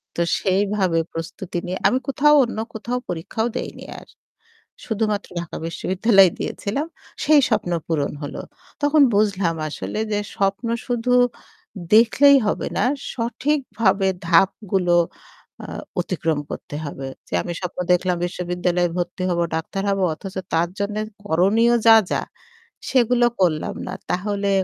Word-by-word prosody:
তো 170 - -1 0.2
সেইভাবে 190 -3 +1
প্রস্তুতি 165 +2 -5
নিয়ে 185 +1 -3
আমি 255 - +2
কোথাও 295 +2 +4
অন্য 235 - -7 0.2
কোথাও 235 +3 -3
পরীক্ষাও 180 +7 -2
দেইনি - - -6 0.2
আর - - -16 0.8
শুধুমাত্র 215 -2 -1
ঢাকা 170 - -7
বিশ্ববিদ্যালয় 190 +3 +4
দিয়েছিলাম 275 +10 -3 0.4
সেই 305 -1 +6
স্বপ্ন 210 -5 0 0.2
পূরণ 150 -4 0
হল। 145 - -6 0.5
তখন 290 +1 +4
বুঝলাম 200 -5 +1
আসলে 185 +7 -5
যে 205 - +1 0.2
স্বপ্ন 200 +4 0 0.2
শুধু 245 0 0 0.8
দেখলেই 275 +5 +7
হবে - - -1
না - - +2 0.3
সঠিকভাবে 230 -5 0 0.2
ধাপগুলো 180 0 +2 0.7
আ - - -7 0.4
অতিক্রম 160 -2 -1
করতে - - -7
হবে। 135 -1 -6 0.2
যে - - -10
আমি 175 - -4
স্বপ্ন 180 0 -5
দেখলাম 180 0 +2
বিশ্ববিদ্যালয়ে 180 0 -1
ভর্তি 180 +1 -3
হবো 170 -1 +1
ডাক্তার 165 +4 -3
হব 195 0 0
অথচ 190 +4 -9 0.2
তার 170 +1 +2
জন্যে 210 +1 -2 0.3
করণীয় 205 +8 +3
যা, 225 - +10 0.2
যা - - +1 0.7
সেগুলো 245 -1 +3
করলাম 160 -4 +1
না। 180 - -4 0.2
তাহলে 200 +2 -1
195 Hz, 130 wpm, -22 LUFS, 175-225 Hz, 0.8 s, যা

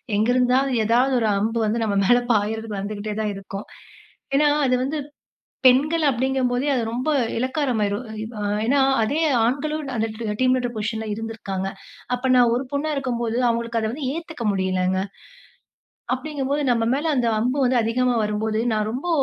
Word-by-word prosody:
எங்க 215 +2 +2
இருந்தாது 255 +2 +3
ஏதாவது 240 +5 +3
ஒரு 225 - +1
அம்பு 225 +3 0
வந்து 225 +2 0
நம்ம 210 -2 0
மேல 245 +4 +5
பாயறதுக்கு 215 -1 -1
வந்துகிட்டே 210 +1 -4
தான் 215 -1 -1
இருக்கும். 195 +1 -7 0.7
ஏனா, 295 +2 +4 0.2
அது 255 -1 +3
வந்து 285 +4 -2 0.7
பெண்கள் 300 +6 +4
அப்டிங்கும்போதே, 260 +1 0
அது 250 - 0
ரொம்ப 255 +6 -1 0.3
இலக்காரமாயிரும். 250 -5 -1 0.4
அ - - -3 0.2
ஏனா, 275 +3 +3 0.2
அதே 285 +9 0 0.2
ஆண்களும் 300 +6 -1
அந்த 225 0 +1 0.3
டீம் 255 0 +4
லீடர் 245 -1 -2
பொசிஷன்ல 220 +1 -3
இருந்திருக்காங்க. 210 -4 -4 0.5
அப்ப 250 +1 -1
நான் 240 -2 +5
ஒரு 250 +3 -1
பொண்ணா 285 +2 -1
இருக்கும்போது 240 -4 -2
அவங்களுக்கு 235 0 -1
அத 220 - -1
வந்து 275 0 -4
ஏத்துக்க 325 -6 -6
முடியலங்க. 185 -1 0 1.1
அப்டிங்கும்போது 285 +1 -2
நம்ம 230 -1 +1
மேல 295 +4 -1
அந்த 245 -2 +1
அம்பு 250 +5 0
வந்து 250 0 +3
அதிகமா 250 +2 +1
வரும்போது, 215 +1 -1
நான் 215 0 0
ரொம்ப 270 +9 -4
240 Hz, 155 wpm, -23 LUFS, 220-265 Hz, 1.1 s, மேல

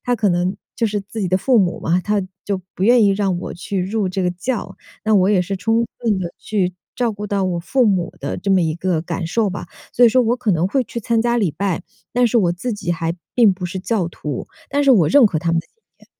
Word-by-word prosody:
他 245 - +1
可 210 -1 +2
能 175 +2 0 0.2
就 230 - +1
是 210 -1 -1
自 205 +3 -7
己 195 - 0
的 185 - +3
父 245 +4 +3
母 180 -3 +1
嘛， 175 +2 +1
他 210 0 0 0.2
就 200 -2 -1 0.2
不 185 - -5
愿 240 +1 +6
意 200 - +5
让 195 -2 0
我 - - -6
去 185 +1 -3
入 200 0 -1
这 185 +1 -2
个 180 - +1
教， 210 +7 -4 0.3
那 220 - +3
我 190 -2 +4
也 195 -3 +3
是 195 +2 -3
充 225 +5 +1
分 220 -5 0
地 175 -2 -4
去 185 -4 -1 0.2
照 240 -3 0
顾 210 +1 -6
到 200 -2 0
我 175 -2 -1
父 245 +9 +1
母 190 -5 +1
的 140 - -3
这 195 +2 -2
么 190 -2 +4
一 160 -1 0
个 170 -2 -1
感 170 0 -3
受 210 +4 0
吧。 185 - -6 0.3
所 245 0 +6
以 - - +7
说 255 +2 +4
我 240 +2 +1
可 240 -5 0
能 170 +1 +1
会 260 +2 +1
去 235 - -6
参 230 +1 +1
加 240 +1 +1
礼 200 -8 +1
拜， 180 +3 -2 0.3
但 245 0 +3
是 235 +1 +2
我 175 -5 +2
自 220 +8 -4
己 175 -4 -2
还 165 0 -2 0.2
并 230 -5 +5
不 180 -1 -5
是 180 +2 -5
教 200 -4 0
徒， 150 -5 -5 0.2
但 285 +1 +1
是 275 - +5
我 175 -10 +4
认 280 -4 +6
可 175 -6 -1
他 170 0 0
们 165 - +2
的 - - -21
信 - - -43 0.2
念。 - - -21
195 Hz, 290 characters per minute, -20 LUFS, 180-225 Hz, 0.3 s, 以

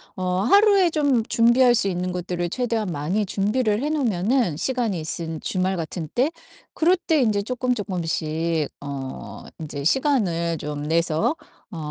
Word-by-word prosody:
어 185 0 -1
하루에 395 - +5
좀 285 -7 +2
준비할 240 +2 +5
수 210 -4 +1
있는 180 0 -2
것들을 175 -1 -3
최대한 225 -3 -1
많이 170 +8 -1
준비를 210 +3 0
해 295 - 0
놓으면은 230 - +1
시간이 235 -5 -1
있은 160 0 -4
주말 185 0 -1
같은 160 -1 -5
때 270 +6 +2 0.4
그럴 350 +3 +3
때 320 -4 +1
인제 210 -4 +1
쪼끔쪼끔씩 170 - -1
어 140 -2 -7 0.2
인제 145 -2 -6
시간을 170 - +1
좀 145 0 -5
내서 165 - +1 0.4
어 175 - -7
195 Hz, 285 characters per minute, -23 LUFS, 165-250 Hz, 0.4 s, 하루에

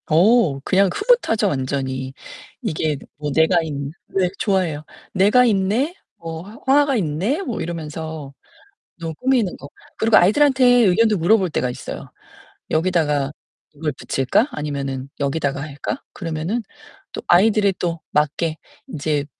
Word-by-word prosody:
어 170 - +4
그냥 195 +5 +3
흐뭇하죠 410 - +2
완전히. 130 -3 -2 0.5
이게 155 -1 -1 0.2
뭐 150 0 -3
내가 160 +4 +3
있 160 - -5 0.4
네 185 -2 +2
좋아해요. 180 -7 0 0.3
'내가 210 +6 +5
있네?' 225 - +1 0.2
뭐 165 -1 -6
'화 210 +4 -12 0.2
화가 285 -3 +2
있네?' 195 - -1
뭐 245 - -4
이러면서 160 -3 -6 0.7
너무 165 -1 -5
꾸미는 250 - +1
거 140 - -10 0.3
그리고 220 -1 +4
아이들한테 260 +8 +4
의견도 230 -3 +4
물어볼 185 +2 +3
때가 125 -5 -1
있어요. - - -8 0.6
"여기다가 155 -4 +1 0.4
이걸 150 +1 -3
붙일까 135 - 0
아니면은 140 -2 -4
여기다가 140 0 -1
할까?" 145 - -5
그러면은 165 +6 -3 0.5
또 - - -5
아이들에 200 +2 +4
또 170 -2 -2
맞게 155 +2 0 0.3
인제 150 -1 -2
170 Hz, 290 characters per minute, -21 LUFS, 150-215 Hz, 0.7 s, 내가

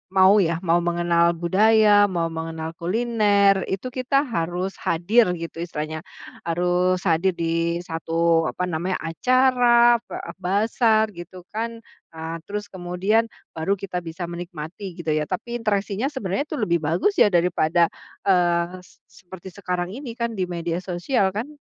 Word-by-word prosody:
mau 190 +1 +7
ya, 165 - -1
mau 170 0 +3
mengenal 170 0 +2
budaya, 210 +6 +4 0.3
mau 165 -1 +1
mengenal 160 0 -5
kuliner, 205 0 +3 0.2
itu 195 +6 -3
kita 255 +2 -1 0.2
harus 175 +3 -1
hadir 200 +8 +3
gitu 165 0 -7
istilahnya. 155 -1 -4 0.5
Harus 180 +2 +1
hadir 170 +3 +3
di 165 +1 -1
1, 165 0 +1
apa 180 - -4
namanya, 175 +4 -1
acara 240 +4 +4
ba - - -6 0.3
bazar 220 +3 +2
gitu 175 +1 -10
kan, 230 +1 -4 0.3
eee, 160 0 -6
terus 205 +3 -5
kemudian 185 +4 0 0.3
baru 160 +4 -2
kita 185 -2 -5
bisa 170 +2 -6
menikmati 170 +1 -7 0.2
gitu 160 -2 -2
ya, 155 - +1
tapi 235 +6 -4
interaksinya 205 +1 -1
sebenarnya 210 -1 -2
itu - - -5
lebih 170 -6 +1
bagus 180 - +1
ya - - +7
daripada, 170 -1 +2 0.4
eee, 175 -1 +2
s - - -22
seperti 185 0 -13
sekarang 180 -1 -3
ini 265 -2 -7
kan 235 - 0
di - - +2
media 170 -1 -3
sosial 190 +3 0
kan? 225 +6 -2
180 Hz, 145 wpm, -23 LUFS, 170-210 Hz, 0.5 s, mau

